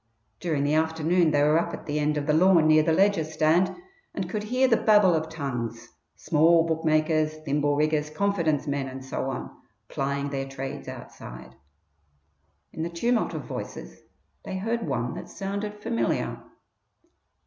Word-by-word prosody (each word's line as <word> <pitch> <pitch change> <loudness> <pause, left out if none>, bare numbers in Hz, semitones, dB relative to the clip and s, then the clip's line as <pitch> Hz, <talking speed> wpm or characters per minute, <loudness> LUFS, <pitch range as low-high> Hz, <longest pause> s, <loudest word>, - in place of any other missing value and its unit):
During 155 -5 -1
the 145 +1 +1
afternoon 160 +2 +2
they 145 -1 +2
were 150 +2 +4
up - - -2
at - - -12
the 150 0 -2
end 150 0 +1
of 145 - -2
the 150 - +2
lawn 170 0 +5
near 155 0 +6
the 160 +1 +1
Leger 195 0 +3
stand 160 +3 +2 0.4
and 190 -3 -2
could 210 +3 -3
hear 255 +4 +2
the 235 - +4
babel 210 -5 +5
of 160 0 -1
tongues, 120 -7 -5 0.3
small 165 +2 +4
bookmakers, 155 -1 +1
thimble 145 0 +1
riggers, 150 0 +1
confidence 160 -4 0
men, 140 -2 -2
and 130 0 -8
so 130 0 -3
on, 130 - -6 0.3
plying 140 +1 -2
their 135 -1 -3
trades 135 0 -6
outside. 65 +2 -10 1.2
In - - -5
the 165 - -2
tumult 235 +8 0
of - - -4
voices - - -7 0.4
they 190 - -5
heard 225 +1 -2
one 125 -3 -2
that - - -8
sounded 200 +1 -4
familiar. 230 +3 -2
155 Hz, 160 wpm, -26 LUFS, 145-180 Hz, 1.2 s, near